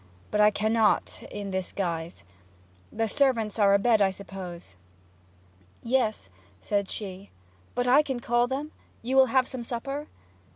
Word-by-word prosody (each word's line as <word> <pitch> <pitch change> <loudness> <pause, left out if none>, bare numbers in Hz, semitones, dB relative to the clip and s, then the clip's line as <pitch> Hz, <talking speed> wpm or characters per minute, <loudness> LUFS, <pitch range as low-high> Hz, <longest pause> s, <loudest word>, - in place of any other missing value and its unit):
'But 210 - +2
I 210 - +7
cannot 215 +1 +1
in 205 -1 -6
this 190 -1 -3
guise. 170 -3 -4 0.7
The 225 0 -1
servants 230 -4 +1
are 200 -1 +5
abed, 220 +1 +3
I 195 - +5
suppose?' 185 - -9 1.1
'Yes,' 230 - 0 0.3
said 200 - -1
she. 195 -2 -6 0.5
'But 245 0 0
I 265 +4 +6
can 265 -4 -3
call 240 0 +2
them? 280 +4 -4 0.3
You 255 +3 -1
will 265 -1 +7
have 255 +1 +2
some 255 - -5
supper?' 275 +5 -4
220 Hz, 140 wpm, -27 LUFS, 195-250 Hz, 1.1 s, I